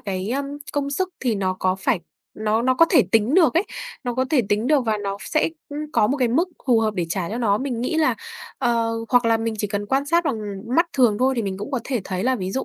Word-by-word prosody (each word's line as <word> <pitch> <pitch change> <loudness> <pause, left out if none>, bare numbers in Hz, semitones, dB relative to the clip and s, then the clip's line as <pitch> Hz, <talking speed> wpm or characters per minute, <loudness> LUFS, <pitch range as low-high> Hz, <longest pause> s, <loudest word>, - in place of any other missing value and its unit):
cái, 190 +1 -3
ơ, 275 +2 0 0.3
công 280 -1 -1
sức 370 +6 -1
thì 245 -4 +1
nó 190 -2 -1
có 185 0 +2
phải 190 -1 0 0.3
nó 215 +1 0
nó 255 +1 +3
có 330 - +6
thể 295 -9 +6
tính 225 +6 +3
được 320 -8 +5
ấy, 340 - +4 0.4
nó 245 - -2
có 260 +1 +1
thể 285 -5 +4
tính 210 +3 +1
được 295 -1 +4
và 215 -1 +1
nó 200 -1 -3
sẽ, 310 - 0 0.2
ưm, 290 0 -6
có 210 - +4
một 275 - 0
cái 250 -3 +1
mức 330 +10 +2 0.2
phù 235 -3 +4
hợp 215 -1 0
để 175 -3 -1
trả 175 0 -2
cho 230 - -3
nó. 210 -4 +2
Mình 255 -3 -3
nghĩ 255 +6 -1
là, 315 -1 +3 0.4
ờ, 230 -2 +1 0.2
hoặc 245 -1 +4
là 225 0 +4
mình 225 0 -2
chỉ 210 - 0
cần 205 0 -3
quan 270 +5 0
sát 340 +2 +2
bằng 270 -7 -1 0.4
mắt 335 +1 +4
thường 240 -6 +3
thôi 260 +1 +3
thì 230 - 0
mình 195 -1 -3
cũng 205 +7 -6
có 260 -3 -1
thể 255 -4 -1
thấy 185 +2 -3
là, 260 0 +2
ví 185 -2 -4
dụ 265 - -2
235 Hz, 275 wpm, -22 LUFS, 210-275 Hz, 0.4 s, có